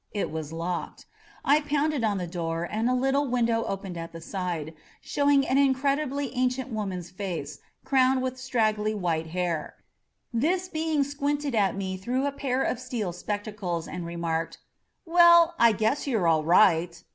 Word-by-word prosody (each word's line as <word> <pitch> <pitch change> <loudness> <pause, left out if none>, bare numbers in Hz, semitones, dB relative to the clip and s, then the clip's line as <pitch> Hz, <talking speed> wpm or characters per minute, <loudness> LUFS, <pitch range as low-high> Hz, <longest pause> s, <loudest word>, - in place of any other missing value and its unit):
It 205 -6 -2
was 160 -1 -5
locked. 170 +2 -4 0.4
I 290 +2 +5
pounded 295 -2 0
on 210 -3 +1
the 180 - -3
door 165 -1 -3
and 220 +7 -1
a 255 - +2
little 270 +3 +1
window 235 -2 +1
opened 195 -2 -5
at 165 0 -7
the 165 - -7
side, 165 -3 -4 0.3
show 285 0 0
ing 280 -1 +4
an 265 - +3
incredibly 275 0 +1
ancient 255 +1 0
woman's 185 -5 -4
face, 185 -2 -5 0.3
crowned 260 -1 +3
with 260 0 -3
straggly 215 -4 0
white 165 -5 -1
hair. 170 -1 -2 0.6
This 350 +10 +1
being 315 -3 0
squinted 285 0 -2
at 200 -4 +2
me 190 -1 -3
through 250 +8 -1
a 285 - 0
pair 270 -2 -1
of 235 - -1
steel 235 -8 -3
spectacles 205 -3 -4
and 180 - -5
remarked, 170 -1 -3 0.5
^'Well, 340 0 +7
I 235 -1 +7
guess 220 +8 0
you're 220 -10 +1
all 160 -2 +3
right!" 170 -1 +4
220 Hz, 165 wpm, -27 LUFS, 180-275 Hz, 0.6 s, ^'Well